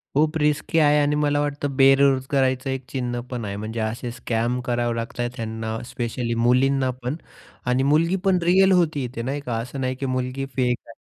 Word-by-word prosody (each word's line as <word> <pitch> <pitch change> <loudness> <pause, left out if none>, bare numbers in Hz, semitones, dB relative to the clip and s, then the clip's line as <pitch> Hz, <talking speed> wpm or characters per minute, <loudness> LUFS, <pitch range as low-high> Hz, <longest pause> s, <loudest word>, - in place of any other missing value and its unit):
खूप 155 +2 +2
रिस्की 150 +2 0
आहे 150 -1 +5
आणि 145 +1 +1
मला 145 -1 +1
वाटत 145 0 -2
बेरोजगारांच 135 -1 +3
एक 130 0 -3
चिन्ह 125 -2 -3
पण 120 -4 -4
आहे. 100 0 -4
म्हणजे 110 +2 -5
असे 115 +2 -3
स्कॅम 120 +1 -1
करावे 120 -1 0
लागत 115 +1 -5
आहे 120 0 0
त्यांना, 110 0 -4
स्पेशली 120 -1 -3
मुलींना 130 +3 +3
पण 125 +5 -2 0.5
आणि 125 +1 +2
मुलगी 160 +6 +3
पण 190 -2 +4
रिअल 190 +2 +5
होती 160 -6 +2
इथे 120 -1 -6
नाही 135 +4 -2
का 120 -4 -3
असं 125 +4 -5
नाही, 130 0 -1
की 135 - -4
मुलगी 130 +1 -2
फेक 125 -2 +1
आहे. 115 - -15
130 Hz, 190 wpm, -23 LUFS, 120-145 Hz, 0.5 s, आहे